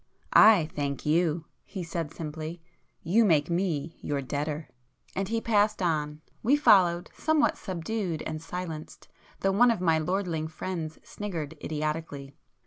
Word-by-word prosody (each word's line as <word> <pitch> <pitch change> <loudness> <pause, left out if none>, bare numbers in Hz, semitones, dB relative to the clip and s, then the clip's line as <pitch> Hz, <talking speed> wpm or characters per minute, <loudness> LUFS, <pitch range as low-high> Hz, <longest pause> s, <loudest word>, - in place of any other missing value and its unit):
"I 210 -7 +7
thank 140 -1 -3
you!" 165 +1 +2 0.2
he 190 -2 -6
said 165 -2 -4
simply—"You 165 +5 -3
make 160 -5 +3
me 170 -3 -1
your 145 -1 -2
debtor." 145 +3 -3 0.5
And 195 0 -1
he 230 +2 0
passed 215 -1 +2
on; 155 -4 -1 0.2
we 260 +6 +4
followed, 180 -11 +4
somewhat 315 -1 +2
subdued 185 -2 -3
and 155 -1 -4
silenced, 165 -2 -7 0.3
though 195 - +2
one 240 +5 +5
of 230 - +1
my 165 -3 +3
lordling 165 -1 -1
friends 160 -1 -5
sniggered 165 -7 -5
idiotically. 150 -2 -3
165 Hz, 135 wpm, -28 LUFS, 155-195 Hz, 0.5 s, I